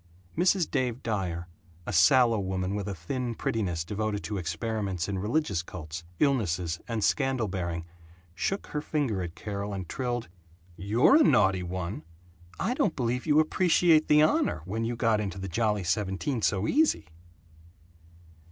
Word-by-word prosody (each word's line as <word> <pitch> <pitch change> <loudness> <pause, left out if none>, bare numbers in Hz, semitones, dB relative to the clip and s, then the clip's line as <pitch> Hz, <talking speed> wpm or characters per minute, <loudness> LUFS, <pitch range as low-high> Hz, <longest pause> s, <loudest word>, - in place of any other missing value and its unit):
Mrs. 180 0 +3
Dave 125 -1 -1
Dyer, 90 -6 -2 0.4
a 100 - -4
sallow 115 +6 +5
woman 95 0 -2
with 100 -1 -3
a 100 - -3
thin 120 - -4
prettiness 90 -9 -2
devoted 105 +1 -2
to 105 -2 -3
experiments 95 +1 -2
in 100 -2 -2
religious 105 - 0
cults, 85 -1 -8
illnesses, 90 - +1
and 115 -3 -2
scandal 130 -3 +1
bearing, 85 -3 -3 0.5
shook 195 - -2
her 150 - -4
finger 140 -12 -1
at 85 -2 -6
Carol 100 -1 -4
and 95 -3 -5
trilled, 120 0 -3 0.5
"You're 110 - +4
a 315 - +6
naughty 95 - +4
one! 90 -1 -4 0.6
I 225 +6 0
don't 205 -9 0
believe 125 +2 -1
you 150 0 +5
appreciate 165 0 +4
the 150 0 +6
honor, 80 - +1
when 110 +4 -2
you 120 +1 -2
got 115 -2 +2
into 95 -3 -4
the 95 0 -5
Jolly 105 +1 0
Seventeen 100 +7 -1
so 100 -1 +1
easy!" 310 +3 +2
105 Hz, 150 wpm, -28 LUFS, 95-125 Hz, 0.6 s, a